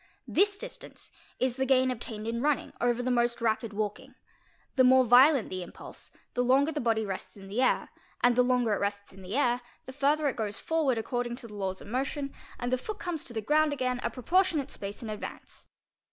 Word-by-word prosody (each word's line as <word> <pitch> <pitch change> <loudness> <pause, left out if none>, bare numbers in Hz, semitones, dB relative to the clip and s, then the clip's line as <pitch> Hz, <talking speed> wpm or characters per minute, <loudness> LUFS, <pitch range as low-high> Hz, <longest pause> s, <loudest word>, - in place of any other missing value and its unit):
This 405 0 +3
distance - - -9 0.3
is 255 -1 0
the 265 - +1
gain 260 -1 +4
obtained 220 -3 -5
in 230 +1 -2
running 295 0 0
over 245 0 +1
the 255 - 0
most 240 0 +1
rapid 225 -1 0
walking; 215 +6 -4 0.6
the 260 - +5
more 260 0 +6
violent 255 +2 +6
the 185 0 -3
impulse, 175 - -11 0.2
the 245 - +1
longer 270 +5 +4
the 300 - -3
body 225 -2 +1
rests 195 +1 -6
'in 195 -1 -11
the 220 +6 0
air; 255 - +2 0.3
and 245 -1 +5
the 250 - +5
longer 245 -3 +2
it - - 0
rests 200 0 -3
in 195 - -13
the 190 +4 -5
air, 245 -3 +2 0.2
the 260 - -9
further 290 +2 +2
it 270 - -1
goes 210 -2 -3
forward 310 -7 +1
according 240 +1 -2
to 240 -1 -8
the 210 - -12
laws 190 -2 -3
of - - -11
motion, 275 +4 -2 0.2
and 245 +1 -2
the 255 - +2
foot 430 +10 -5
comes 345 -6 -4
to 240 - -7
the 220 - -2
ground 305 +3 +3
again 255 -2 -1
a - - -1
proportionate 315 +1 +1
space 200 +3 -7
in 225 - -5
advance. 210 - -8
245 Hz, 215 wpm, -29 LUFS, 220-275 Hz, 0.6 s, more